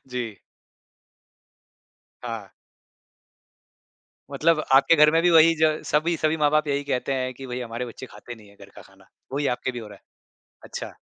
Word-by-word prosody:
जी। 115 -5 -5 1.9
हाँ। 115 -4 -6 1.8
मतलब 155 +3 +1
आपके 140 +5 +5
घर 150 0 +6
में 165 +1 +3
भी 175 - +4
वही 165 0 +6
ज - - +5 0.2
सभी 160 +3 +1
सभी 155 +1 0
माँ-बाप 155 0 +2
यही 140 0 -1
कहते 140 -1 -2
हैं 130 -1 -2
कि 135 +1 -10
भई, 125 0 -5
हमारे 120 +1 -5
बच्चे 125 +2 -10
खाते 120 - -11
नहीं 110 -3 -17
हैं 100 - -20
घर - - -14
का - - -11
खाना। - - -22 0.3
वही 145 +1 -1
आपके 130 - -3
भी 120 - -6
हो 110 -2 -9
रहा 100 - -13
है। - - -38 0.6
अच्छा। - - -7
135 Hz, 175 wpm, -24 LUFS, 120-155 Hz, 1.9 s, घर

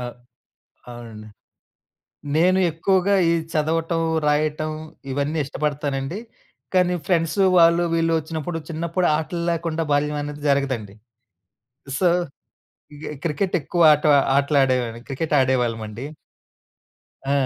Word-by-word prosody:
ఆ! - - -5 0.9
అవునండి. 115 -3 -10 1.1
నేను 180 +3 +4
ఎక్కువగా 190 +4 +1 0.2
ఈ - - +3 0.2
చదవటం, 165 +2 0 0.2
రాయటం 155 +1 0 0.4
ఇవన్నీ 145 +4 -1
ఇష్టపడతానండి, 145 +2 -3 0.6
కానీ 180 -1 +3
ఫ్రెండ్సు 175 +2 +1
వాళ్ళు, 170 +1 +5
వీళ్ళు 165 0 +1
ఒచ్చినప్పుడు, 160 +1 -5
చిన్నప్పుడు 170 +2 -1
ఆటల్లేకుండా 165 0 -2
బాల్యవనేది 145 0 -1
జరగదండి. 130 -8 0 1.0
సో, 180 +1 +3 0.9
ఇగ 145 - -11 0.2
క్రికెటెక్కువ 175 +1 0
ఆట 150 0 0 0.3
ఆటలడేవా‌‌న్ని. 130 -5 +1
క్రికెట్ 150 +3 -2
ఆడేవాళ్ళవండి. 120 -2 -1 1.2
ఆ! 140 - 0
155 Hz, 90 wpm, -22 LUFS, 140-170 Hz, 1.2 s, వాళ్ళు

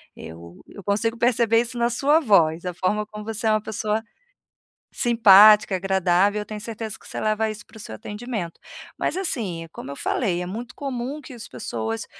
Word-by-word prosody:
Eu 85 +2 -11
eu 200 - -12
consigo 220 +4 0
perceber 235 -1 +3
isso 240 +1 -6
na 235 0 +2
sua 280 +6 +3
voz, 170 - +3
a 180 - -3
forma 210 +4 -1
como 210 -1 -9
você 225 0 -3
é - - +4
uma 215 0 +2
pessoa 215 0 -2 0.9
simpática, 215 -4 +6
agradável, 190 +2 +2
eu 210 - -6
tenho 215 -1 -7
certeza 220 -1 -6
que - - -18
você - - -6
leva 215 +1 0
isso 210 -1 -8
pro 220 - -15
seu 200 - -8
atendimento. 210 - -6 0.4
Mas - - -1
assim, 200 - -3
como 140 - -8
eu 140 - -7
falei, 180 - -1
é - - -5
muito 230 +6 -7
comum 270 +1 -4
que 260 -2 -11
as 235 - -9
pessoas 115 -3 -4
215 Hz, 185 wpm, -23 LUFS, 185-235 Hz, 0.9 s, simpática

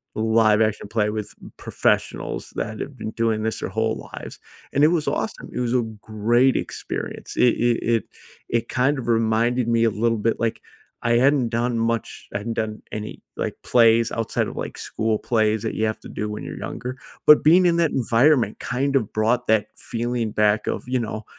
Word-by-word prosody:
a - - -4
live 110 -1 +4
action 110 -1 0
play 105 -1 0
with 105 -1 -4 0.3
pr - - -15
professionals - - -1
that 110 0 -4
have 140 - -6
been 110 -1 -5
doing 110 -2 0
this 110 0 -2
their - - -4
whole 110 +2 -2
lives, - - -8 0.3
and 140 - +3
it 150 - +8
was 165 -3 0
awesome, - - -3
it - - -3
was 125 0 0
a 125 - +3 0.2
great 120 +5 +2
experience, - - -5
it 125 - +5 0.2
it 120 - +1 0.2
it 115 - -1 0.5
it 115 0 -1
kind 130 +3 +1
of 120 - -6
reminded 115 +1 +2
me 115 -1 +2
a - - +4
little 115 +2 +1
bit, 115 +2 0
like 115 -1 -1 0.4
I 120 - +1
hadn't 130 -1 +3
done 120 +1 0
much 115 -1 -2
I 100 - -1
hadn't 115 +3 -4
done 110 0 -7
any, 105 0 -6 0.2
like, - - -2
plays 115 -1 +4
outside 115 -2 -1
of, - - -8
like, - - -5
school 110 -1 -1
plays 110 -2 +1
that 110 - -3
you 110 - +1
have 110 0 -2
to - - -11
do 105 - -4
when 105 - -6
you're - - -7
younger, 125 +2 -6 0.3
but 150 - +8
being 175 +4 +6
in 170 -1 +2
that 165 -3 +2
environment 120 -1 +3
kind 135 +2 -1
of 115 -6 0
brought 115 +3 +1
that 110 -1 +3
feeling 120 -1 -2
back 105 0 +2
of - - -2
you 130 0 0
know, 110 -1 -4
115 Hz, 205 wpm, -23 LUFS, 110-125 Hz, 0.5 s, it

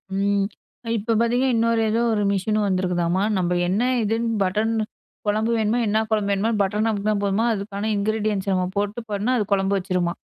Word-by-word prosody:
ம். 200 0 +1 0.5
இப்ப 225 +3 -1
பார்த்தீங்கன்னா, 245 +3 +2
இன்னொரு 230 0 +2
ஏதோ 225 +2 +1
ஒரு 210 - 0
மிஷின் 205 +2 0
வந்திருக்குதாம்மா! 185 -1 0
நம்ம 180 -1 0
என்ன 190 +5 +1 0.2
இதுன்னு 225 +2 0
பட்டன் 210 +4 0 0.6
குழம்பு 215 +3 +1
வேணுமா? 220 +2 +1
என்ன 215 +2 +2
குழம்பு 210 -2 +1
வேணுமோ! 210 +4 0
பட்டன் 210 +3 +1
அமுக்குன்னா 210 0 0
போதுமா, 200 +3 +1
அதுக்கான 200 +1 -4
இன்கிரீடியன்ட்ஸ் 205 -1 -1
நம்ம 185 -1 0
போட்டு 205 +3 -1
போனா, 210 +5 0
அது 210 - 0
குழம்பு 195 0 +1
வச்சுருமா! 180 -2 -1
205 Hz, 165 wpm, -23 LUFS, 195-220 Hz, 0.6 s, பார்த்தீங்கன்னா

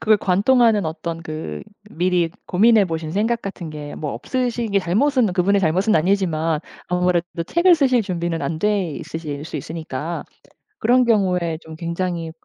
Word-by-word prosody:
그걸 215 -1 +4
관통하는 210 +1 +3
어떤 165 +1 -5
그 155 - -6 0.3
미리 175 -1 +1 0.2
고민해 215 +2 +5
보신 160 -1 -4
생각 225 +4 0
같은 180 -5 -6
게 150 -1 -7 0.2
뭐 150 -2 -4
없으시기 230 - -1
잘못은 230 +4 +2
그분의 195 +2 +2
잘못은 185 +6 +2
아니지만 165 -3 +1 0.3
아무래도 180 -1 0
책을 345 +1 +5
쓰실 260 -6 +3
준비는 170 -3 -2
안 160 -1 -2
돼 205 -5 +1
있으실 150 -2 -6
수 160 - -6
있으니까 160 +1 -5 0.6
그런 250 +2 +4
경우에 180 -7 +1
좀 160 0 -10
굉장히 170 -1 -3
180 Hz, 335 characters per minute, -21 LUFS, 165-210 Hz, 0.6 s, 고민해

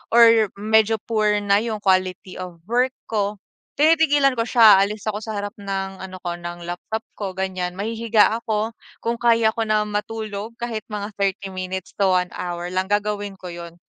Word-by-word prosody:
or 230 -2 +7
medyo 220 +2 +3
poor 210 -2 +2
na 200 0 +4
yung 220 -1 -3
quality 185 -1 0
of 180 -2 -8
work 250 +2 +2 0.2
ko, 210 -1 0 0.4
tinitigilan 290 -3 +4
ko - - +2
siya, 225 -4 +7
aalis 210 +1 -2
ako 210 - -2
sa 220 0 -5
harap 205 +1 -4
ng 195 -1 -4
ano 185 -1 -7
ko 175 -1 -3
ng 175 0 -7
laptop 175 +6 -4 0.2
ko 195 -3 -4
ganyan, 185 -1 -3
mahihiga 225 +2 +2
ako, 220 0 -1 0.3
kung 235 0 -1
kaya 230 -2 +4
ko 225 - -1
na 215 -1 +2
matulog 210 +1 -4
kahit 235 -2 -3
mga 210 -1 -4
30 195 0 -1
minutes 185 0 -5
to 200 - +3
1 180 -1 +2
hour 175 0 -4
lang, 185 +1 -1
gagawin 205 -1 -1
ko 185 -1 -8
'yon 170 0 -9
205 Hz, 175 wpm, -22 LUFS, 190-225 Hz, 0.4 s, or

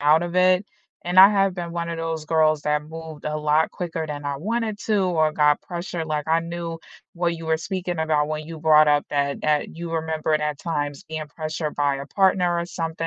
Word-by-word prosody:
out 150 +3 +4
of 175 0 -4
it, 185 +1 +4 0.4
and 175 +1 +1
I 190 +1 +11
have 195 -2 +2
been 170 -2 -5
one 170 0 -3
of 165 - -4
those 165 -1 -3
girls 155 -1 +2
that 150 0 0
moved 160 -1 -9
a 150 0 -2
lot 150 +1 +2
quicker 165 -3 -4
than 145 -1 -6
I 140 -1 -2
wanted 215 +6 -2
to, 215 -2 +2
or 160 -4 +2
got 150 -1 +3
pressure 175 -1 -5
like 150 -2 -3
I 165 +1 +3
knew 170 0 -5 0.4
what 170 -1 0
you 165 - -8
were 160 0 +2
speaking 175 0 -4
about 155 -2 +1
when 155 0 -4
you 165 0 -8
brought 155 -1 +5
up 145 0 +3
that 140 -1 -1
that 150 +1 0
you 170 0 -6
remember 160 -1 0
that 150 -1 -2
times 145 -4 -3
being 155 -1 -5
pressured 155 -1 -4
by 145 -1 +1
a 140 0 -7
partner 180 0 +2
or 170 - -2
something, 165 -1 -4
160 Hz, 220 wpm, -23 LUFS, 150-175 Hz, 0.4 s, I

